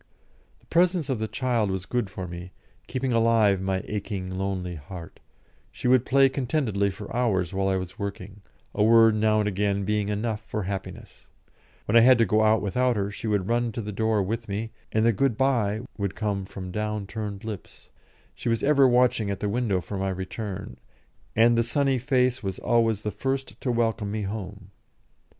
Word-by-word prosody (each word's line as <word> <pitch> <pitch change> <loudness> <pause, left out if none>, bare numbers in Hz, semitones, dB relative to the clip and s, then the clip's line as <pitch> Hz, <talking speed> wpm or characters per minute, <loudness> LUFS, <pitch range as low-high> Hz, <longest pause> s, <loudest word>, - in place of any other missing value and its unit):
The - - -27
presence 170 -4 +2
of 125 - -1
the 110 - -1
child 120 -4 0
was 95 -1 -3
good 120 0 -1
for 95 -2 -6
me, 90 +1 -8 0.3
keeping 130 0 -2
alive 115 -4 +3
my 95 0 -1
aching, 100 -3 -4
lonely 95 -1 -3
heart: 85 +2 -10 0.5
she - - -4
would 125 -1 +4
play 135 +1 +5
contentedly 125 -7 0
for 100 +3 -8
hours 100 -8 +1
while 95 0 0
I 95 - +2
was 95 +1 -5
working, 100 0 -6 0.3
a 105 - +2
word 115 0 +6
now 110 0 +2
and 105 - +1
again 100 0 0
being 105 0 0
enough 105 +1 -2
for 105 -1 -4
happiness; 95 0 -7 0.6
when 105 - 0
I - - +10
had 125 +2 +7
to 115 - +4
go 110 0 +2
out 110 0 +3
without 125 +5 +1
her, 100 -1 -1
she 105 - -6
would 100 -3 0
run 120 0 +1
to 115 - -3
the 105 - -5
door 110 0 +1
with 110 +3 -4
me, 110 +3 -3 0.2
and 110 +1 +2
the 115 - +4
"good 120 +1 +1
bye" 115 -6 +1 0.2
would 100 -2 -2
come 100 -3 -2
from 95 -1 -7
down 105 +1 -2
curved 105 0 -6
lips; 105 -8 -8 0.4
she 120 - -4
was 115 -1 0
ever 140 -2 +5
watching 125 -3 +3
at 100 - -3
the 105 - -1
window 105 -4 0
for 100 +2 -5
my 95 0 -1
return, 95 - -5 0.6
and 115 +2 +5
the 115 - +3
sunny 135 +2 +1
face 125 -1 +1
was 95 -3 -4
always 115 -3 +1
the 105 - -2
first 135 +2 -3
to 125 - 0
welcome 115 -3 0
me 105 +1 -2
home. 100 -1 -6
105 Hz, 195 wpm, -26 LUFS, 100-120 Hz, 0.6 s, I